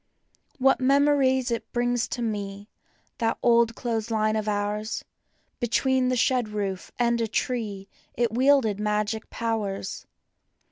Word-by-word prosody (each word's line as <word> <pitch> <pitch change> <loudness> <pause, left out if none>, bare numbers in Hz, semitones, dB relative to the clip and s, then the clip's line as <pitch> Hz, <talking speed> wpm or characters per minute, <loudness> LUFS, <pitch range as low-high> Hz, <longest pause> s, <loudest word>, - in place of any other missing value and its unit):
\ 270 +1 +4
MEMORIES 265 -1 +3
it 230 - -3
brings 245 -1 0
to 245 - -4
me, 205 -2 -4 0.5
that 225 -1 0
old 235 -1 +4
clothes 230 -2 -2
line 215 -1 +1
of 215 -1 -2
ours; 210 +1 -2 0.5
Between 255 +2 +1
the 255 - +1
shed 245 -2 +1
roof 200 -3 -4
and 235 -1 +2
a 225 - 0
tree 215 -4 -2 0.3
it 235 -2 +1
wield¬ 270 +1 +4
ed 205 -1 -3
magic 210 +1 -1
powers. 215 -4 -3
230 Hz, 135 wpm, -26 LUFS, 210-250 Hz, 0.5 s, \